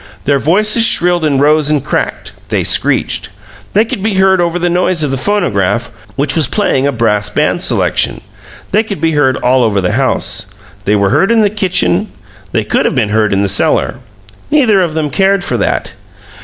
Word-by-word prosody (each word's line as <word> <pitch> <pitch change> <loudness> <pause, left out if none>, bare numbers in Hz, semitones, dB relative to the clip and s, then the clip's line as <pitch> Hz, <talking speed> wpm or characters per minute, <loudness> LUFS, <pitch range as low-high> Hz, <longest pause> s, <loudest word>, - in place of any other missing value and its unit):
Their 140 0 +1
voices 215 - +2
shrilled 175 -5 +3
and 145 -3 +1
rose 150 +1 +2
and 150 -3 0
cracked - - -3 0.2
they - - 0
screeched. - - 0 0.4
They 215 +3 +3
could 215 - -5
be 210 0 -1
heard 190 -1 +3
over 170 0 -1
the 175 0 -1
noise 175 -1 0
of 145 - -1
the - - -1
phonograph, 120 - -1 0.2
which 140 +2 +1
was 160 -3 +2
playing 140 -10 0
a - - +1
brass 110 -4 0
band - - 0
selection. - - +1 0.5
They 210 - +3
could 215 -3 -6
be 165 - +1
heard 135 -4 +1
all 125 0 +2
over 105 -3 +1
the 90 -1 -1
house. - - -1 0.4
They 105 - +2
were 100 -1 +1
heard 195 - +2
in 230 -1 +3
the 205 -2 +2
kitchen; 190 -1 0 0.4
they 110 - 0
could 105 - 0
have - - 0
been 115 -5 0
heard 110 0 +1
in 100 0 +1
the - - 0
cellar. 95 +4 0 0.5
Neither 250 -10 +3
of 165 -3 -2
them 155 -2 -2
cared 195 -1 +1
for - - -2
that. - - -2
155 Hz, 195 wpm, -12 LUFS, 125-195 Hz, 0.5 s, shrilled